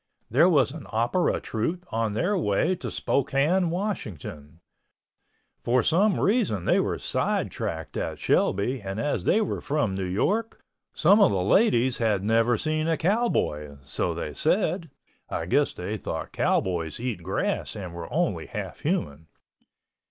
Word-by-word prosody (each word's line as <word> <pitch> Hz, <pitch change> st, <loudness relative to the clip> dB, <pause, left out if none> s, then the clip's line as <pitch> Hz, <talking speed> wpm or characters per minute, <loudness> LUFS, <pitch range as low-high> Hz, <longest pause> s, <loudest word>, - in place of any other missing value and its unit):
There 150 Hz, +10 st, +5 dB
was 140 Hz, -6 st, +3 dB
an 155 Hz, -1 st, -9 dB
opera 120 Hz, +11 st, +1 dB
troupe 165 Hz, +11 st, -3 dB
on 110 Hz, -2 st, 0 dB
their 180 Hz, -, +1 dB
way 160 Hz, -, +1 dB
to 180 Hz, -, -6 dB
Spokane, 145 Hz, +7 st, +1 dB
Washington. 90 Hz, -, -5 dB, 1.0 s
For 125 Hz, 0 st, +2 dB
some 190 Hz, +5 st, +3 dB
reason 195 Hz, -, +1 dB
they -, -, +3 dB
were -, -, 0 dB
sidetracked 80 Hz, -1 st, -2 dB
at -, -, -3 dB
Shelby 115 Hz, +6 st, +1 dB
and 95 Hz, +1 st, -5 dB
as 145 Hz, +4 st, -1 dB
they 220 Hz, -, +3 dB
were 210 Hz, -, -2 dB
from 145 Hz, -9 st, 0 dB
New 95 Hz, 0 st, -2 dB
York, 200 Hz, -, -1 dB, 0.3 s
some 195 Hz, +7 st, +4 dB
of 200 Hz, -, +7 dB
the 95 Hz, -2 st, 0 dB
ladies 125 Hz, -, +3 dB
had 105 Hz, -5 st, +1 dB
never 115 Hz, +2 st, +3 dB
seen 155 Hz, +2 st, -1 dB
a 165 Hz, -1 st, +1 dB
cowboy, 155 Hz, -, 0 dB
so 70 Hz, -, -2 dB
they -, -, -4 dB
said 165 Hz, 0 st, 0 dB, 0.4 s
(I 80 Hz, -, -3 dB
guess 140 Hz, -, +2 dB
they 100 Hz, +5 st, -4 dB
thought -, -, -5 dB
cowboys 85 Hz, -4 st, 0 dB
eat 120 Hz, -6 st, -3 dB
grass 95 Hz, +3 st, -2 dB
and 90 Hz, -4 st, -6 dB
were 85 Hz, -1 st, -7 dB
only -, -, 0 dB
half -, -, -6 dB
human). 75 Hz, +2 st, -2 dB
120 Hz, 150 wpm, -26 LUFS, -, 1.0 s, of